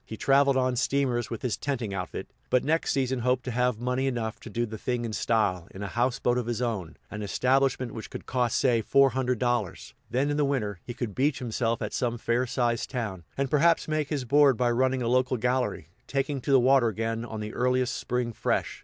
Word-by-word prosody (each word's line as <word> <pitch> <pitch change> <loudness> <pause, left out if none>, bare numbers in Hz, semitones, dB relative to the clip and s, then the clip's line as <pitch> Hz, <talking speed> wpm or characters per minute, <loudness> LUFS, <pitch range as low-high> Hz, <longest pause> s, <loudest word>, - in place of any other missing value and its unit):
He 110 -3 -8
traveled 140 +1 +4
on 130 -1 +1
steamers 125 -2 0
with 115 - -6
his 120 -5 0
tenting 120 -8 -3
outfit, 90 -2 -5 0.2
but 125 - +3
next 160 +3 +1
season 130 -1 0
hoped 125 +1 +1
to 125 - -3
have 125 -1 +1
money 125 +2 0
enough 115 -4 -2
to - - -10
"do 120 +3 -1
the 110 -1 -8
thing 120 0 -2
in 110 - -4
style," 100 -7 0
in 95 - -8
a - - -3
houseboat 125 0 +1
of 120 - -4
his 120 -1 -2
own, 110 -9 -3
an 105 - -5
establishment 130 +4 +1
which 110 - -8
would - - -7
cost 125 -2 0
say 120 -3 +3
four 135 +4 +4
hundred 125 0 0
dollars; 115 -6 -2 0.2
then, 135 +4 +1
in 145 - -1
the 150 - +3
winter, 110 -9 -1
he 120 - -7
could 115 -5 -4
beach 140 +4 +1
himself 115 -2 -1
at 105 - -4
some 120 -2 -1
fair 120 +2 0
sized 120 -1 0
town, 105 -9 -4
and 135 -1 -1
perhaps 165 +3 +3
make 155 -2 -1
his 140 -5 -2
board 140 0 +5
by 120 0 +2
running 130 +1 +1
a - - -1
local 130 +1 +2
gallery, 125 - -1 0.2
taking 135 0 -1
to - - -6
the 135 -1 +6
water 130 -1 +4
again 115 +1 -2
on 110 -2 -6
the 105 0 -5
earliest 125 0 +1
spring 125 -2 -2
"fresh." - - -1
125 Hz, 225 wpm, -27 LUFS, 115-130 Hz, 0.2 s, the